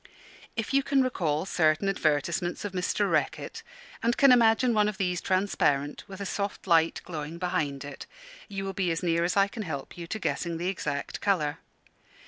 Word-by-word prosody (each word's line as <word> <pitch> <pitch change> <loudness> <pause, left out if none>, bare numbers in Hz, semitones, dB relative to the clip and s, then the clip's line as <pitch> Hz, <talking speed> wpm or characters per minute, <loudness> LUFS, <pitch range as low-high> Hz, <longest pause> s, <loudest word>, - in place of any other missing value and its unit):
If 225 +4 -3
you 275 - +5
can 275 -1 +2
recall 165 -10 0
certain 160 0 +2
advertisements 170 0 0
of 205 - -3
Mr. 180 -1 0
Reckitt, - - -1 0.4
and 235 +1 +1
can 275 -2 +7
imagine 235 0 +5
one 210 -1 +3
of 210 - -6
these 180 -3 -1
transparent, 150 -7 +1
with 190 -1 -9
a 200 - -4
soft 200 +1 -3
light 165 -3 +3
glowing 160 -1 -5
behind 155 -6 -2
it, 145 -1 -8 0.4
you 195 -2 -4
will 195 - -3
be 190 -2 0
as 165 +2 -1
near 170 -1 +2
as 175 +3 0
I 195 0 +5
can 220 +3 -7
help 155 -3 -6
you 170 - -6
to 200 - -3
guessing 170 -4 -2
the 175 +2 -1
exact 150 -7 -3
colour. 160 -8 +1
180 Hz, 185 wpm, -28 LUFS, 160-200 Hz, 0.4 s, can